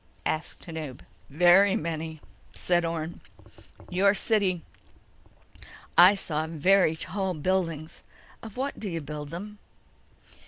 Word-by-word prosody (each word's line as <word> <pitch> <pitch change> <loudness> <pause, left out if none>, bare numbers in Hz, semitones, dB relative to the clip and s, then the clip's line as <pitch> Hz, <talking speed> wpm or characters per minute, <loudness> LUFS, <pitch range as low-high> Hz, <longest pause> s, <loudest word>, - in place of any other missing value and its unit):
asked 155 +1 -3
Tanub. 155 -6 -7 0.3
"Very 180 +6 +5
many," 160 -1 -4 0.3
said 175 -1 +1
Orne. 165 0 -4 0.7
"Your 195 +3 +3 1.8
city—I 180 +4 +8
saw 160 -5 -2
very 165 +1 +3
tall 190 +2 -3
buildings. 165 -1 -2 0.4
Of 225 +1 -10
what 275 +2 -3
do 210 - -4
you 165 -2 -3
build 150 0 -7
them?" 205 +6 -8
170 Hz, 105 wpm, -27 LUFS, 155-190 Hz, 1.8 s, city—I